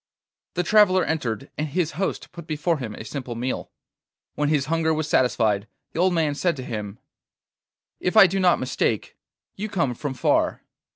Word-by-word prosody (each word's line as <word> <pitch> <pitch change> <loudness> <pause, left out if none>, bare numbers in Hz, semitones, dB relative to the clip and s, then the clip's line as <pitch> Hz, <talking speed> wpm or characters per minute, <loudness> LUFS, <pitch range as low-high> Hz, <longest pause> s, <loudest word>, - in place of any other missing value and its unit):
The 180 - +1
traveller 190 -2 +5
entered, 135 -5 -2
and 155 - 0
his 160 +2 -1
host 190 +7 -3
put 170 -2 -10
before 155 +1 0
him 110 -5 -5
a 110 - -8
simple 125 0 -5
meal. 125 +3 -3 0.6
When 150 0 0
his 145 -3 +2
hunger 160 +1 +1
was 155 0 -2
satisfied 110 -7 +2 0.2
the - - -5
old 180 0 +3
man 155 -3 +1
said 170 +4 0
to 130 - -5
him: 105 -4 -5 1.0
'If 180 +4 0
I 215 - +11
do 190 +2 0
not 180 -2 +4
mistake, 120 -4 -1 0.4
you 215 +2 -4
come 170 -11 0
from 135 +2 -5
far. 125 - +1
150 Hz, 175 wpm, -24 LUFS, 125-175 Hz, 1.0 s, I